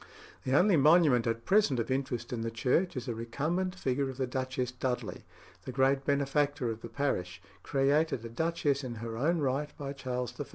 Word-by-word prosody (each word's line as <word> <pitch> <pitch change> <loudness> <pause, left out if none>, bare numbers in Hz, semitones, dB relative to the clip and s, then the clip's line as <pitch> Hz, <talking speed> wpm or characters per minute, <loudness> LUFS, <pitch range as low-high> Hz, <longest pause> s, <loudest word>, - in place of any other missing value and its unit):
The 130 +2 +3
only 185 0 +5
monument 150 -5 +5
at 115 0 -2
present 195 - +3
of 115 +2 -2
interest 130 -3 -2
in 115 - -2
the 115 - -2
church 130 +9 0
is 120 - -4
a 120 - -1
recumbent 155 +11 -2
figure 135 -4 -1
of 130 - -7
the 130 - 0
Duchess 130 0 -2
Dudley, 125 -2 -3 0.4
the - - -4
great 135 +2 +2
benefactor 140 -2 +1
of 110 0 -7
the - - -7
parish, 95 -10 -2 0.2
created 140 -2 +1
a - - -5
duchess 145 +1 0
in 125 -2 -5
her 115 0 -5
own 155 +9 +1
right 140 +2 0
by 140 -1 -5
Charles 125 -3 -4
I. 145 - -2
135 Hz, 195 wpm, -30 LUFS, 120-145 Hz, 0.4 s, only